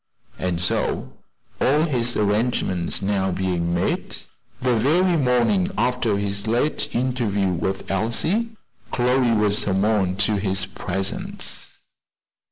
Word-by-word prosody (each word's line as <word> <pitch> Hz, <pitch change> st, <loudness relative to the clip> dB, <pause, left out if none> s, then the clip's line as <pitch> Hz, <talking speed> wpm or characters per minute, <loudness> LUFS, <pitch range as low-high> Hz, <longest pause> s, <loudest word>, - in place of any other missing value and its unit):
And 90 Hz, -2 st, -1 dB
so 90 Hz, -, -1 dB, 0.5 s
all 150 Hz, +4 st, +3 dB
his 120 Hz, -6 st, 0 dB
arrangements 105 Hz, -5 st, 0 dB
being 95 Hz, -, -2 dB
now 95 Hz, -1 st, +1 dB
made 90 Hz, -2 st, -1 dB, 0.4 s
the 125 Hz, -2 st, +1 dB
very 170 Hz, +10 st, +3 dB
morning 145 Hz, -, +2 dB
after 125 Hz, -4 st, +1 dB
his 100 Hz, +1 st, -2 dB
late 145 Hz, +6 st, +1 dB
interview 120 Hz, -6 st, 0 dB
with 95 Hz, +3 st, -2 dB
Elsie, 120 Hz, -, 0 dB, 0.4 s
Chloe 125 Hz, 0 st, +2 dB
was 105 Hz, 0 st, +2 dB
summoned 95 Hz, -1 st, +1 dB
to 105 Hz, +1 st, +2 dB
his 95 Hz, -1 st, 0 dB
presence. 95 Hz, 0 st, -5 dB
105 Hz, 110 wpm, -23 LUFS, 95-125 Hz, 0.5 s, all